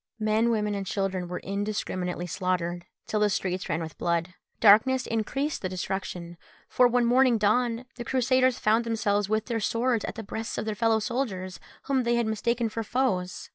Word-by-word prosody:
Men, 215 +2 +2
women, 210 -2 0
and 200 -1 -2
children 190 -3 -2
were 180 +1 -4
indiscriminately 195 -3 -3
slaughtered, 175 -1 -2 0.2
till 215 - -1
the 210 0 +3
streets 185 -1 -2
ran 165 +1 -1
with 160 - -9
blood. 170 +1 0 0.3
Darkness 240 +5 +5
increased 270 +7 -2
the 185 - -2
destruction, 180 -2 -4 0.3
for 250 - +4
when 245 0 +2
morning 250 0 +4
dawned 230 +3 +1
the 240 - -4
Crusaders 255 0 +2
found 220 +2 +2
themselves 210 -3 0
with 215 0 0
their 230 -2 -2
swords 230 +1 0
at - - -5
the 225 - -6
breasts 220 +2 -5
of - - -2
their 215 - -1
fellow 225 +2 +2
soldiers, 210 -5 -3 0.2
whom 270 -2 +1
they 240 -1 +1
had 235 -1 +1
mistaken 235 +2 0
for 225 +1 -4
foes. 205 -6 -1
215 Hz, 180 wpm, -27 LUFS, 190-235 Hz, 0.3 s, Darkness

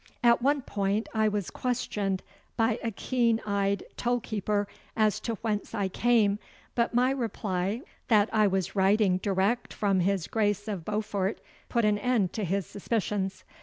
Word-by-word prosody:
At 235 0 +5
one 280 +1 +2
point 200 +1 -1
I 220 -1 +3
was 205 -3 -1
questioned 205 -6 -1 0.3
by 225 0 +2
a 230 - -1
keen 230 +1 +1
eyed 200 -1 0
toll 245 0 +1
keeper 205 -2 -1 0.3
as 215 -2 +3
to 230 - -3
whence 210 -2 -2
I 200 -3 0
came, 210 -1 +3 0.3
but 235 0 0
my 250 +2 +4
reply 210 -4 -2 0.3
that 215 -3 +5
I 215 -1 +5
was 190 0 -1
riding 195 -1 +4
direct 200 +5 0
from 200 -2 +2
his 185 -1 +1
Grace 205 -2 0
of 200 -6 -3
Beaufort 210 -1 -1 0.3
put 235 -3 +2
an 210 -1 +2
end 220 -5 +1
to 215 - -2
his 195 +1 0
suspicions. 195 -2 -2
210 Hz, 160 wpm, -28 LUFS, 195-230 Hz, 0.3 s, At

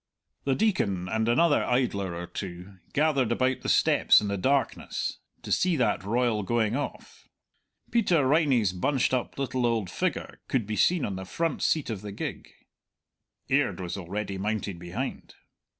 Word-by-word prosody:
The 135 -1 +2
Deacon 100 - 0
and 110 +3 0
another 145 +5 +4
idler 100 -8 0
or 85 +1 -5
two 90 +1 -7
gathered 140 -5 +2
about 130 +2 +1
the - - -3
steps - - +5
in 105 - -3
the 100 - -1
darkness, 135 +7 -1 0.2
to - - -6
see 180 -2 +3
that 110 - +1
royal 115 +1 +1
going 110 +2 0
off. 145 - -6 0.6
Peter 180 - +3
Riney's 130 - +3
bunched 130 +8 +1
up 125 -2 -1
little 130 -2 -1
old 115 -6 0
figure - - -2
could 125 -5 0
be 105 +1 -3
seen 175 +7 +3
on 95 -2 -4
the 95 - -5
front 165 - -2
seat 155 -7 +1
of 105 -4 -4
the 105 -1 -7
gig; 100 - -5 1.0
Aird - - +1
was 90 -2 -4
already 100 +1 -4
mounted 100 -3 -2
behind. 85 0 -5
115 Hz, 160 wpm, -27 LUFS, 100-135 Hz, 1.0 s, steps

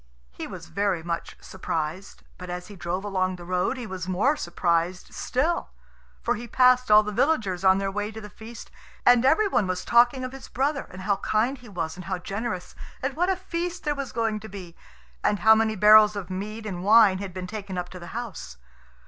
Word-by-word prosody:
He 60 - -7
was - - -9
very 200 -4 -1
much 170 0 -4
surprised, 170 0 -5 0.2
but 180 -1 -8
as 180 +1 -6
he 205 - -10
drove 180 +1 -3
along 185 -2 -1
the 175 -1 -11
road 180 +8 0
he 245 - -5
was 185 -4 -6
more 205 +11 +2
surprised 170 - -1
still. 310 +2 -1 0.5
For 240 - +1
he 240 +1 -6
passed 250 +1 +4
all 210 0 +7
the 210 - -4
villagers 210 - +1
on 190 0 +5
their 195 0 -1
way 210 +1 -2
to 220 - -8
the 210 - -9
feast; 225 +2 -11 0.3
and 245 -1 +6
every 320 +11 +4
one 210 - +1
was 185 0 -3
talking 245 +2 +4
of 255 - -4
his 270 0 -10
brother, 275 +3 -1
and 185 +1 -9
how 200 0 +1
kind 230 +7 0
he 245 -2 -14
was 165 -4 -4
and 180 - -9
how 190 -1 -2
generous, 195 0 -5 0.3
and 270 +1 -1
what 355 +4 +1
a 380 - +2
feast 355 -1 -4
there 295 - 0
was 275 -3 -5
going 225 -2 -1
to 220 +1 -10
be, 180 -4 -9 0.5
and 205 - +1
how 220 0 +8
many 220 0 +1
barrels 210 +1 +7
of 190 -2 -6
mead 215 +4 -5
and, 180 -4 -5
wine 205 -2 +6
had 200 -1 -5
been 185 0 -6
taken 195 -1 -6
up 180 0 -3
to 180 - -10
the 175 - -10
house. 200 - -7
210 Hz, 215 wpm, -25 LUFS, 185-240 Hz, 0.5 s, how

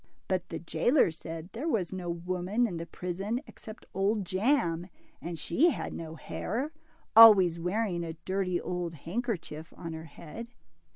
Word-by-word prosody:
But 185 -1 -1
the 165 - -4
jailer 170 - +3
said 165 +2 -8
there 270 +8 -3
was 195 - 0
no 180 -2 -4
woman 180 +6 0
in 185 -7 -3
the 165 0 -5
prison 195 +7 -3
except 215 +1 -12
Old 200 +1 +1
Jam, 185 - +1 0.3
and 170 0 -5
she 260 - +3
had 290 - -3
no 160 -1 -6
hair, 255 - -3 0.4
always 195 -7 +9
wearing 180 0 -1
a 165 -1 -4
dirty 185 -2 0
old 175 -2 -3
handkerchief 170 - -4
on 165 -2 -6
her 160 0 -7
head. 170 +8 -9
180 Hz, 155 wpm, -30 LUFS, 170-220 Hz, 0.4 s, always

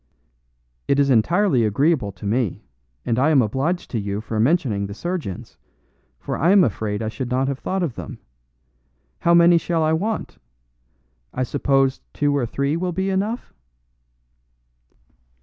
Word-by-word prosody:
"It 140 - +2
is 140 -1 +3
entirely 140 - +3
agreeable 125 +1 +1
to 90 +2 -11
me, 110 -1 -1 0.4
and 115 0 0
I 140 +4 +3
am 150 -3 +4
obliged 135 - -2
to 115 - -1
you 100 0 -3
for 110 0 -4
mentioning 115 - +1
the 100 - -8
surgeons, 170 - -5 0.6
for - - -4
I 165 - +3
am 195 -1 +6
afraid 105 - -2
I - - -2
should 120 +3 -4
not 130 +1 0
have 140 -1 -3
thought 190 0 -2
of 155 -8 -2
them. - - -8 1.0
How 170 0 +3
many 170 0 +6
shall 165 -1 -1
I 155 0 +2
want? 210 +7 -3 1.0
I 130 - 0
supposed 135 0 +1
two 145 -1 +1
or 130 -4 0
three 140 +5 -1
will 180 +2 -2
be 190 +2 -1
enough?" 205 +6 -2
140 Hz, 155 wpm, -22 LUFS, 115-170 Hz, 1.0 s, am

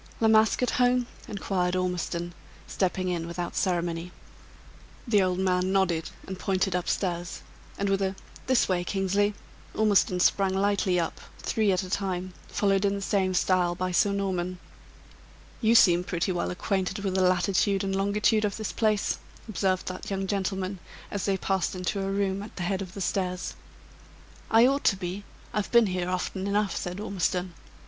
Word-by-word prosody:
"La 225 - +3
Masque 220 +2 +4
at 250 - +1
home?" 250 0 +3 0.2
inquired 185 -3 -1
Ormiston, 175 -1 -2 0.3
stepping 185 -1 -1
in, 170 -2 -2
without 175 0 -4
ceremony. 175 -1 -1 1.0
The 210 -4 +4
old 185 -1 +1
man 185 0 +1
nodded, 180 -4 +1 0.2
and 190 -1 -7
pointed 190 -1 0
up 180 - -1
stairs; 175 -2 -2 0.3
and 200 - -1
with 195 0 +1
a 190 0 0 0.3
"This 260 -2 +3
way, 180 -2 +1
Kingsley," 200 +2 +1 0.4
Ormiston 205 -4 +3
sprang 190 +1 +3
lightly 195 -2 +2
up, 165 - -3 0.2
three 215 -3 +1
at 185 0 +1
a 185 - -7
time, 185 -2 -2
followed 195 -1 +1
in 200 0 +2
the 200 - -4
same 190 -1 +1
style 180 -1 +2
by 185 +1 -2
Sir 200 +3 +3
Norman. 185 -2 -2 1.0
"You 225 0 +4
seem 175 -5 +6
pretty 175 0 -1
well 175 -1 -1
acquainted 190 +2 -1
with 195 -2 -1
the 190 - +2
latitude 185 +2 +2
and 195 0 -1
longitude 210 +2 +2
of 205 -2 -1
this 215 -2 -3
place," 215 -2 +1 0.3
observed 190 -3 0
that 185 - -6
young 195 -1 -2
gentleman, 190 -1 -2 0.3
as 200 -2 -2
they 195 -1 +1
passed 190 -2 -1
into 185 +2 -2
a 195 - -2
room 195 0 0
at 205 - -9
the 180 - -4
head 190 +2 -1
of 185 -2 -7
the 200 - -5
stairs. 180 0 -1 1.0
"I 225 +2 +6
ought 275 +2 +2
to 195 - +5
be; 190 +2 -5 0.3
I've 210 -1 -2
been 235 -1 +6
here 180 -2 -2
often 185 +1 -2
enough," 205 0 +1
said 180 +2 -4
Ormiston. 185 -3 -1
190 Hz, 170 wpm, -27 LUFS, 180-200 Hz, 1.0 s, seem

